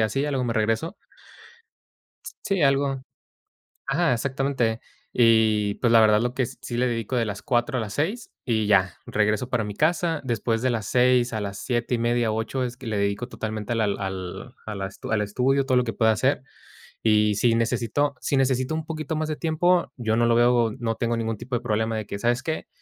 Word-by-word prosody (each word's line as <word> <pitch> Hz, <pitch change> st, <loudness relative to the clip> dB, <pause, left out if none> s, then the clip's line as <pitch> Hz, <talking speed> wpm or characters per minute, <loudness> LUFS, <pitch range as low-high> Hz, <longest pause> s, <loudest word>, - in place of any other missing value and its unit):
así, 110 Hz, +6 st, 0 dB
ya 150 Hz, -, -1 dB
luego 130 Hz, -3 st, -1 dB
me 115 Hz, -2 st, -1 dB
regreso. 115 Hz, -, 0 dB, 1.5 s
Sí, 195 Hz, -4 st, 0 dB
algo 135 Hz, -1 st, +2 dB, 0.8 s
Ajá, 135 Hz, 0 st, +2 dB
exactamente. 130 Hz, -2 st, -1 dB, 0.3 s
Y 110 Hz, -3 st, +3 dB
pues 120 Hz, -, +1 dB
la 115 Hz, -, +7 dB
verdad 105 Hz, -1 st, +5 dB
lo 120 Hz, +1 st, -1 dB
que 130 Hz, 0 st, 0 dB
sí 120 Hz, -, -7 dB
le 125 Hz, +1 st, +2 dB
dedico 115 Hz, 0 st, -2 dB
de 115 Hz, -, +1 dB
las 105 Hz, -2 st, -5 dB
4 130 Hz, 0 st, 0 dB
a -, -, 0 dB
las 105 Hz, -2 st, -5 dB
6 200 Hz, +11 st, -2 dB
y 110 Hz, -3 st, +1 dB
ya 95 Hz, -4 st, +3 dB
regreso 105 Hz, +3 st, 0 dB
para 120 Hz, -3 st, 0 dB
mi 105 Hz, -1 st, -6 dB
casa, 165 Hz, +2 st, +1 dB
después 115 Hz, -2 st, -1 dB
de 130 Hz, -, +2 dB
las 115 Hz, -3 st, -2 dB
6 125 Hz, -1 st, +3 dB
a 110 Hz, -, -2 dB
las 100 Hz, -1 st, -5 dB
7 120 Hz, 0 st, -2 dB
y -, -, -1 dB
media, 120 Hz, -1 st, +1 dB
8, 110 Hz, +4 st, -2 dB
es 120 Hz, -1 st, -4 dB
que 125 Hz, -, -9 dB
le 110 Hz, -2 st, -1 dB
dedico 100 Hz, +4 st, -1 dB
totalmente 110 Hz, -2 st, -4 dB
a -, -, -1 dB
la 115 Hz, -, +1 dB
al 95 Hz, +3 st, -4 dB
a 110 Hz, -, -5 dB
la 95 Hz, -1 st, -3 dB
estu 95 Hz, -, -9 dB
al 110 Hz, -1 st, +2 dB
estudio 130 Hz, +6 st, +1 dB
todo 130 Hz, -1 st, +1 dB
lo 125 Hz, -, +3 dB
que 115 Hz, -2 st, -3 dB
pueda 110 Hz, 0 st, +3 dB
hacer. 105 Hz, -, +1 dB, 0.6 s
Y 105 Hz, -1 st, +3 dB
si 115 Hz, +3 st, +3 dB
necesito 120 Hz, +5 st, 0 dB
si 140 Hz, -, 0 dB
necesito 130 Hz, +1 st, +1 dB
un 160 Hz, -1 st, -3 dB
poquito 155 Hz, -1 st, -4 dB
más 155 Hz, 0 st, -1 dB
de 155 Hz, -, -1 dB
tiempo, 170 Hz, +3 st, +1 dB
yo 110 Hz, -3 st, 0 dB
no 120 Hz, +1 st, +3 dB
lo 115 Hz, -, +3 dB
veo, 120 Hz, -1 st, +4 dB
no 115 Hz, -1 st, -1 dB
tengo 115 Hz, 0 st, -1 dB
ningún 115 Hz, -1 st, -2 dB
tipo 125 Hz, +4 st, -4 dB
de 120 Hz, -, -1 dB
problema 110 Hz, -1 st, -1 dB
de 110 Hz, -, -4 dB
que, 100 Hz, -, -6 dB
¿sabes 120 Hz, +3 st, +1 dB
qué? 160 Hz, 0 st, -3 dB
120 Hz, 215 wpm, -24 LUFS, 110-135 Hz, 1.5 s, la